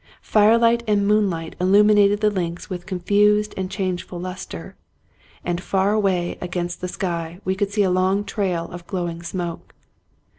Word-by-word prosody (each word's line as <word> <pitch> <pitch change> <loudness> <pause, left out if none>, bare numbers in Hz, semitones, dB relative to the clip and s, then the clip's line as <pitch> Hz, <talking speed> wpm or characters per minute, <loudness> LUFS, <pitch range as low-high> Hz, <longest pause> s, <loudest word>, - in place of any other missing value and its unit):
Firelight 230 +2 +4
and 205 -1 +2
moonlight 190 -6 +1
illumi 205 +4 +5
nated 205 0 +4
the 210 -1 +3
links 175 -1 -4
with 180 -1 -6
confused 210 +3 +2
and 190 -1 -3
changeful 185 -2 -3
luster, 185 +1 -7 0.7
and 175 0 -1
far 195 +1 +1
away 190 -5 0
against 175 -1 -4
the 180 - -2
sky 170 -2 -4
we 190 - +1
could 195 +1 -1
see 205 0 +1
a 185 - +2
long 185 +2 +2
trail 185 -6 -2
of 175 0 -9
glowing 175 -3 -3
smoke. 170 -1 -5
190 Hz, 155 wpm, -22 LUFS, 175-205 Hz, 0.7 s, illumi